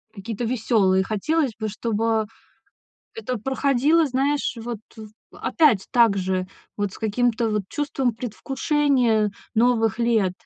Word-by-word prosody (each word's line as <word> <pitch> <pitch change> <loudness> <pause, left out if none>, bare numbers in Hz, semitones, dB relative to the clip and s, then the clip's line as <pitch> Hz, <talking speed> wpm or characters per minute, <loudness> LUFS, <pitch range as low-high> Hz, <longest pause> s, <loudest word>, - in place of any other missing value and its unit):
какие-то 220 +3 -5
веселые. 220 -5 +2
Хотелось 260 +8 0
бы, 220 - -2
чтобы 220 +1 -1 0.9
это 255 - -4
проходило, 275 +6 +2
знаешь, 275 +2 0
вот 230 0 -5 0.2
в 220 -1 -9 0.3
опять 275 - +2
также, 190 -6 +2 0.3
вот 205 -2 -2
с - - -11
каким-то 225 +1 0
вот 210 -1 0
чувством 275 -4 -1
предвкушения 250 -1 0 0.2
новых 225 -2 +2
лет. 225 -6 +2
230 Hz, 115 wpm, -23 LUFS, 215-265 Hz, 0.9 s, веселые